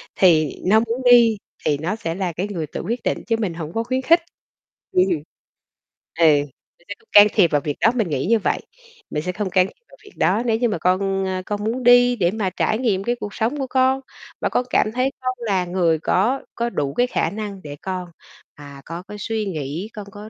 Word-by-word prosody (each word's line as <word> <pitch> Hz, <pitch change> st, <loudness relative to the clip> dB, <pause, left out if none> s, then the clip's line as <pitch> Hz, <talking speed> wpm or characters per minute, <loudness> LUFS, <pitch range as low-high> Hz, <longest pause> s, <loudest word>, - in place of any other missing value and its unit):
thì 160 Hz, -6 st, +4 dB
nó 210 Hz, +4 st, +5 dB
muốn 230 Hz, +2 st, -2 dB
đi 230 Hz, -3 st, +6 dB, 0.3 s
thì 145 Hz, -, +2 dB
nó 165 Hz, +8 st, -2 dB
sẽ 165 Hz, -7 st, -4 dB
là 185 Hz, -2 st, -2 dB
cái 180 Hz, +5 st, -3 dB
người 170 Hz, -6 st, -4 dB
tự -, -, -6 dB
quyết 235 Hz, +3 st, -3 dB
định -, -, 0 dB
chứ 230 Hz, -, +2 dB
mình 200 Hz, -6 st, -1 dB
hổng 165 Hz, -1 st, -7 dB
có 225 Hz, -, -1 dB
khuyến 255 Hz, +2 st, -1 dB
khích. 330 Hz, +6 st, +5 dB, 0.7 s
Ừm. 185 Hz, -, +4 dB, 1.1 s
Ừ, -, -, +4 dB, 0.6 s
mình 175 Hz, -, -28 dB
sẽ -, -, -3 dB
không -, -, -30 dB
can 205 Hz, 0 st, +9 dB
thiệp 180 Hz, -6 st, +4 dB
vào 145 Hz, -2 st, +2 dB
việc 145 Hz, 0 st, -3 dB
đó. 225 Hz, -, +4 dB
Mình 220 Hz, -8 st, 0 dB
nghĩ 140 Hz, -3 st, -1 dB
như 230 Hz, +1 st, +3 dB
vậy, -, -, -1 dB, 0.5 s
mình 150 Hz, -, -3 dB
sẽ 180 Hz, -, -2 dB
không 195 Hz, +2 st, -3 dB
can 185 Hz, 0 st, +3 dB
thiệp 475 Hz, -, -19 dB
vào -, -, -17 dB
việc 410 Hz, -, -15 dB
đó 195 Hz, +8 st, +2 dB
nếu 225 Hz, -2 st, +2 dB
như 240 Hz, 0 st, +1 dB
mà 205 Hz, -, -1 dB
con, 195 Hz, +2 st, +1 dB
à, 185 Hz, 0 st, -2 dB
con 205 Hz, 0 st, -3 dB
muốn 235 Hz, +4 st, -2 dB
đi 245 Hz, 0 st, +6 dB
để 180 Hz, -6 st, +1 dB
mà 205 Hz, -2 st, -1 dB
trải 215 Hz, -, 0 dB
nghiệm 210 Hz, -7 st, 0 dB
cái 240 Hz, +3 st, 0 dB
cuộc 205 Hz, -1 st, -6 dB
sống 235 Hz, +7 st, -1 dB
của 270 Hz, -, -2 dB
con, 260 Hz, +1 st, +2 dB, 0.4 s
và -, -, +1 dB
con 250 Hz, -, 0 dB
cảm 215 Hz, -, +2 dB
thấy 255 Hz, +3 st, 0 dB
con 255 Hz, 0 st, -1 dB
là 195 Hz, -6 st, 0 dB
người 175 Hz, -3 st, +1 dB
có 215 Hz, -, +1 dB
có 235 Hz, 0 st, -1 dB
đủ 140 Hz, -10 st, -2 dB
cái 245 Hz, -, +2 dB
khả -, -, 0 dB
năng 205 Hz, -2 st, -6 dB
để 145 Hz, -1 st, -7 dB
con, 185 Hz, -1 st, -4 dB, 0.5 s
à, 140 Hz, -1 st, -12 dB
có 170 Hz, +2 st, -7 dB
cái 210 Hz, +1 st, -10 dB
suy 220 Hz, +1 st, -2 dB
nghĩ, 160 Hz, +2 st, -4 dB
con 210 Hz, -2 st, -7 dB
có 210 Hz, +2 st, -10 dB
205 Hz, 235 wpm, -21 LUFS, 175-230 Hz, 1.1 s, can